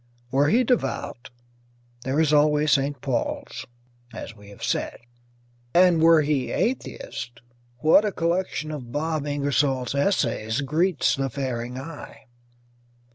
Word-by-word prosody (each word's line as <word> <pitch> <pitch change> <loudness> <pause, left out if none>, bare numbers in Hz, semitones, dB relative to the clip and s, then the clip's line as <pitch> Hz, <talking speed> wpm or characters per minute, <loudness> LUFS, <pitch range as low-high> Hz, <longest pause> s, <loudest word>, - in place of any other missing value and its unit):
Were 140 +2 +3
he 245 +4 +4
devout, 145 - -2 0.8
there 135 +3 0
is 155 -2 +3
always 150 0 +3
St. 140 +1 +1
Paul's, 130 -3 -3 0.4
as 115 - -8
we 105 -1 -15
have 100 - -12
said; - - -1 0.8
and 175 -2 +5
were 165 -1 +6
he 145 -4 0
atheist, 125 - -3 0.4
what 160 +6 +6
a 210 - 0
collection 170 -3 -1
of 130 -6 -7
Bob 155 +1 -2
Ingersoll's 140 -3 0
essays 135 - 0
greets 155 +4 +1
the 135 0 -2
faring 125 -2 -4
eye! 145 +3 -9
145 Hz, 125 wpm, -24 LUFS, 130-160 Hz, 0.8 s, were